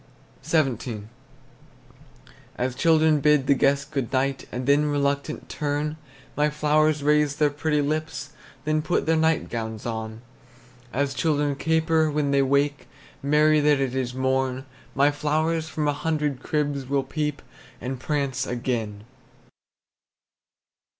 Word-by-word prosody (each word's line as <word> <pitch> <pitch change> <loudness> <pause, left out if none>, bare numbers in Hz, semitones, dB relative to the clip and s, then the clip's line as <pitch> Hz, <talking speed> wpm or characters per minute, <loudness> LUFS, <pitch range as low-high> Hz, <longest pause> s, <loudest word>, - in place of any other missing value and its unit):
XVII. 125 -8 0 1.5
As 125 +1 -1
children 160 +1 +3
bid 150 -1 +3
the 140 - +5
guest 140 +2 +1
good 135 -5 -2
night, 135 0 -1
And 125 +1 -4
then 145 +2 +4
reluctant 145 +1 -1
turn, 150 0 -2 0.4
My 150 +1 +2
flowers 150 0 +2
raise 150 -1 +3
their 150 -1 +2
pretty 150 0 0
lips, 155 +2 -3 0.3
Then 155 0 +1
put 175 - 0
their 160 - +3
nightgowns 115 -9 -1
on. 110 0 -5 0.7
As 140 +2 -1
children 145 +1 +1
caper 160 +1 +2
when 145 -1 0
they 140 0 +4
wake, 140 +2 +1 0.3
Merry 150 +2 +4
that 145 -1 +3
it 135 -2 -1
is 130 -2 -2
morn, 130 0 0 0.3
My 140 +2 +4
flowers 155 +2 0
from 155 -2 -2
a 145 - +2
hundred 150 -2 -1
cribs 145 -3 -1
Will 140 -1 +1
peep, 150 +1 -3 0.4
and 130 0 -5
prance 140 -2 -1
again. 115 -4 -3
145 Hz, 130 wpm, -25 LUFS, 130-150 Hz, 1.5 s, the